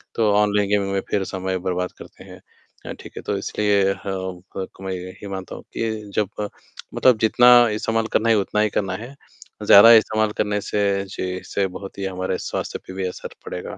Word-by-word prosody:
तो 110 Hz, -2 st, +2 dB
online 105 Hz, -1 st, +2 dB
gaming 100 Hz, -1 st, +1 dB
में 95 Hz, -, 0 dB
फिर 100 Hz, -2 st, 0 dB
समय 95 Hz, 0 st, -2 dB
बर्बाद 90 Hz, 0 st, -1 dB
करते -, -, -13 dB
हैं -, -, -13 dB, 0.4 s
अ, -, -, -5 dB
ठीक -, -, -12 dB
है, -, -, -4 dB
तो 100 Hz, -, -2 dB
इसलिए 100 Hz, -1 st, +1 dB
हाँ, 95 Hz, -2 st, -5 dB, 0.2 s
क 95 Hz, -, -3 dB
कमाई 95 Hz, -1 st, -4 dB
गए 90 Hz, +1 st, -8 dB
ये -, -, -6 dB
मानता 95 Hz, -2 st, -6 dB
हूँ -, -, -10 dB
कि 110 Hz, -2 st, -3 dB
जब 105 Hz, -3 st, +1 dB, 0.6 s
मतलब 125 Hz, -4 st, +4 dB
जितना 120 Hz, +2 st, +4 dB, 0.2 s
इस्तेमाल 110 Hz, +1 st, -1 dB
करना 115 Hz, +1 st, +2 dB
ही 115 Hz, -, +5 dB
उतना 105 Hz, +1 st, 0 dB
ही 105 Hz, -, +2 dB
करना 95 Hz, -2 st, -3 dB
है, 120 Hz, +7 st, -9 dB, 0.5 s
ज़्यादा 110 Hz, +4 st, +9 dB
इस्तेमाल 110 Hz, -1 st, +3 dB
करने 105 Hz, -1 st, 0 dB
से 100 Hz, -1 st, 0 dB
जी, 95 Hz, -, -6 dB
इससे 95 Hz, +1 st, -2 dB
बहुत 100 Hz, -1 st, -10 dB
ही 95 Hz, -, -2 dB
हमारे 95 Hz, -1 st, -2 dB
स्वास्थ्य -, -, -4 dB
पे 95 Hz, -, -8 dB
भी 95 Hz, 0 st, -3 dB
असर 90 Hz, -, -8 dB
पड़ेगा -, -, -6 dB
100 Hz, 200 wpm, -22 LUFS, 95-105 Hz, 0.6 s, ज़्यादा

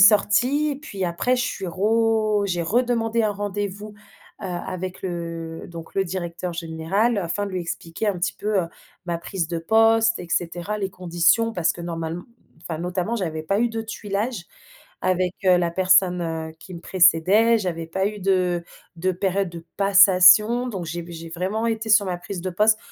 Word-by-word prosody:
sortie, 240 Hz, +8 st, +4 dB
et -, -, -5 dB
puis 200 Hz, -10 st, -5 dB
après, 175 Hz, +9 st, 0 dB
je 245 Hz, -, 0 dB
suis 190 Hz, -, -4 dB
ro 215 Hz, +2 st, +1 dB
j'ai 175 Hz, -2 st, -1 dB
redemandé 230 Hz, +2 st, +1 dB
un 215 Hz, -, +1 dB
rendez-vous, 205 Hz, +1 st, -4 dB, 0.5 s
heu, -, -, -6 dB
avec 185 Hz, 0 st, -5 dB
le, 165 Hz, -2 st, -5 dB
donc, 165 Hz, -1 st, -10 dB
le 195 Hz, -, +1 dB
directeur 175 Hz, -1 st, -4 dB
général 170 Hz, +7 st, -1 dB
afin 200 Hz, +3 st, -2 dB
de -, -, -6 dB
lui 185 Hz, -, -2 dB
expliquer 170 Hz, +4 st, -5 dB
un 190 Hz, -3 st, -1 dB
petit 180 Hz, -, -1 dB
peu, 210 Hz, -1 st, 0 dB
heu, -, -, -4 dB, 0.4 s
ma 170 Hz, -, -1 dB
prise 170 Hz, -1 st, -3 dB
de 170 Hz, -1 st, -2 dB
poste, 225 Hz, +5 st, +3 dB
et 175 Hz, -, -8 dB
cetera, 175 Hz, +5 st, -2 dB
les 195 Hz, -2 st, -2 dB
conditions 175 Hz, +6 st, +1 dB
parce 170 Hz, -3 st, +1 dB
que -, -, -11 dB
normale 165 Hz, -1 st, -4 dB, 0.4 s
enfin 165 Hz, -2 st, -5 dB
notamment, 180 Hz, +6 st, -2 dB
j'avais 160 Hz, -6 st, -3 dB
pas 195 Hz, +6 st, 0 dB
eu 240 Hz, -, +2 dB
de 225 Hz, 0 st, -3 dB
tuilage 215 Hz, -1 st, -4 dB, 0.6 s
avec, 185 Hz, 0 st, +1 dB
heu, 185 Hz, -1 st, +6 dB
la 170 Hz, -1 st, 0 dB
personne, 185 Hz, 0 st, +3 dB
heu, 160 Hz, -1 st, -4 dB
qui 185 Hz, -, -11 dB
me 170 Hz, -, -8 dB
précédait. 190 Hz, +6 st, +4 dB
J'avais 170 Hz, -5 st, -3 dB
pas 190 Hz, +4 st, -1 dB
eu 210 Hz, 0 st, -4 dB
de 180 Hz, -2 st, +1 dB, 0.3 s
de 185 Hz, +3 st, 0 dB
période 190 Hz, +1 st, -1 dB
de 170 Hz, -1 st, -9 dB
passation. 200 Hz, +4 st, +6 dB
Donc, 190 Hz, -7 st, -5 dB
j'ai 170 Hz, +2 st, -4 dB
v 170 Hz, 0 st, -11 dB
j'ai 165 Hz, 0 st, -8 dB
vraiment 190 Hz, +7 st, -2 dB
été 225 Hz, -1 st, -2 dB
sur 205 Hz, -2 st, +5 dB
ma 180 Hz, -, -2 dB
prise 180 Hz, +1 st, -7 dB
de 185 Hz, -, -3 dB
poste 215 Hz, +4 st, +3 dB
185 Hz, 185 wpm, -23 LUFS, 170-215 Hz, 0.6 s, heu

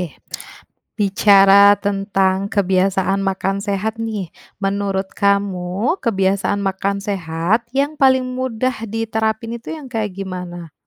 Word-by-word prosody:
Oke. 175 Hz, -4 st, -7 dB, 0.8 s
Bicara 200 Hz, 0 st, +6 dB
tentang 195 Hz, -1 st, 0 dB
kebiasaan 195 Hz, 0 st, +1 dB
makan 195 Hz, 0 st, -1 dB
sehat 210 Hz, +2 st, -2 dB
nih, 220 Hz, -5 st, -4 dB, 0.3 s
menurut 195 Hz, -1 st, -1 dB
kamu 200 Hz, -, 0 dB
kebiasaan 200 Hz, -2 st, 0 dB
makan 200 Hz, 0 st, -1 dB
sehat 195 Hz, +2 st, -1 dB
yang 285 Hz, +3 st, 0 dB
paling 260 Hz, -2 st, +4 dB, 0.2 s
mudah 255 Hz, -2 st, -2 dB
diterapin 225 Hz, +1 st, -2 dB
itu 235 Hz, -, -8 dB
yang 305 Hz, -4 st, -8 dB
kayak 220 Hz, -4 st, -3 dB
gimana? 180 Hz, -4 st, -7 dB
200 Hz, 110 wpm, -19 LUFS, 190-220 Hz, 0.8 s, Bicara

